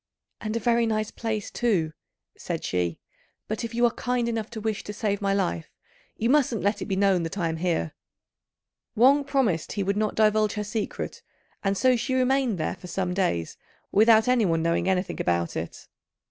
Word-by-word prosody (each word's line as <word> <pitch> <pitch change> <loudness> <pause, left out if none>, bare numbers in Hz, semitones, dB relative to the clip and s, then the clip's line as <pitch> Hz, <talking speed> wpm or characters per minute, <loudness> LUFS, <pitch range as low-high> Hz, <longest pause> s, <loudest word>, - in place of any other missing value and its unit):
"And 215 0 -4
a - - +1
very 235 +1 +2
nice 215 -1 -1
place, 220 -3 -3
too," 185 -10 0 0.4
said - - -4
she; 90 -2 -1 0.5
"but 215 +2 -3
if 230 0 -5
you 240 +1 +4
are 235 - +3
kind 245 -1 -1
enough 225 -2 -2
to 230 - -6
wish 215 -1 -2
to 210 - -5
save 205 -1 -1
my 200 -1 +1
life, 85 - -1 0.5
you 230 - 0
mustn't 255 -5 +2
let 205 0 +1
it - - -4
be 195 - -1
known 195 -2 +3
that 165 +4 -4
I 170 -3 0
am 160 - -3
here." 165 - -1 1.0
Wang 270 +5 +5
promised 240 - 0
he 200 - -1
would 200 +1 0
not 215 0 0
divulge 215 -1 +3
her 210 - -2
secret, 210 +1 -4 0.4
and 195 0 +1
so 255 +6 +4
she 245 +2 -1
remained 260 -4 +2
there 155 +3 -2
for 180 - -11
some 180 0 -2
days 85 - -1 0.3
without 220 +2 +5
anyone 200 -10 +2
knowing 170 +2 +1
anything 185 0 -1
about 85 -1 0
it. 80 +1 -6
210 Hz, 190 wpm, -26 LUFS, 180-230 Hz, 1.0 s, Wang